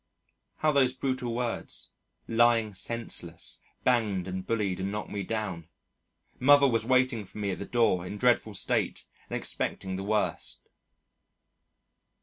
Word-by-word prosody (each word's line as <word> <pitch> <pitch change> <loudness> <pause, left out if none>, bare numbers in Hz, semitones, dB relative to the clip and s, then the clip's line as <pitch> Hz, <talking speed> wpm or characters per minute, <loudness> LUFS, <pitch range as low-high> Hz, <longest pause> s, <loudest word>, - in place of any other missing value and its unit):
(How 155 - +3
those 135 -3 +3
brutal 130 -3 -2
words, 120 -1 -2 0.4
"lying 115 -2 +3
senseless," 95 -5 -3 0.2
banged 105 -7 +1
and 95 0 -4
bullied 100 -5 -1
and 95 +1 -2
knocked 105 +1 -4
me 100 - -2
down. 95 -6 -4 0.7
Mother 140 +2 +7
was 115 -4 +2
waiting 125 -2 +2
for 100 - -14
me 100 -2 -1
at 90 - -4
the 100 - -4
door 115 -7 +2
in - - -5
a - - -6
dreadful 115 -3 +2
state - - 0 0.2
and - - -1
expecting 95 -1 -2
the 95 - -4
worst.) 105 +1 -1
110 Hz, 140 wpm, -29 LUFS, 95-125 Hz, 0.7 s, Mother